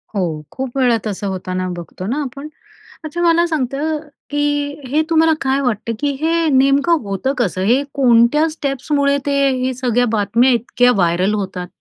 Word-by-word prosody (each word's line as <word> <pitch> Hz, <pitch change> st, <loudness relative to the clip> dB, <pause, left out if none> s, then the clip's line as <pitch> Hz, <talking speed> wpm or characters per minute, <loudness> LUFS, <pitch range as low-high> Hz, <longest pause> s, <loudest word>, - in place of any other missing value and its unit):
हो, 165 Hz, -5 st, -2 dB
खूप 265 Hz, 0 st, -5 dB
वेळा 245 Hz, -3 st, +3 dB
तसं 205 Hz, -1 st, -3 dB
होतांना 185 Hz, -1 st, -3 dB
बघतो 175 Hz, +2 st, -8 dB
ना 275 Hz, +7 st, -1 dB
आपण. 275 Hz, +2 st, -6 dB, 0.6 s
अच्छा, 315 Hz, +3 st, -4 dB
मला 340 Hz, 0 st, +4 dB
सांगता 275 Hz, -5 st, -2 dB, 0.5 s
की 290 Hz, 0 st, -1 dB, 0.5 s
हे 295 Hz, +5 st, +1 dB
तुम्हाला 320 Hz, 0 st, +4 dB
काय 270 Hz, +1 st, +1 dB
वाटतं, 230 Hz, -2 st, -2 dB
की 290 Hz, -1 st, 0 dB
हे 330 Hz, +1 st, +1 dB
नेमकं 275 Hz, +4 st, +3 dB
होतं 200 Hz, +7 st, -2 dB
कसं? 185 Hz, -6 st, -1 dB
हे 250 Hz, +6 st, +3 dB
कोणत्या 255 Hz, +3 st, +4 dB
स्टेप्समुळे 280 Hz, -1 st, 0 dB
ते 280 Hz, -1 st, 0 dB, 0.3 s
हे 260 Hz, 0 st, 0 dB
सगळ्या 245 Hz, -1 st, +1 dB
बातम्या 230 Hz, +4 st, +2 dB
इतक्या 245 Hz, +1 st, +2 dB
व्हायरल 185 Hz, -1 st, +1 dB
होतात? 185 Hz, -3 st, -4 dB
255 Hz, 160 wpm, -18 LUFS, 210-285 Hz, 0.6 s, मला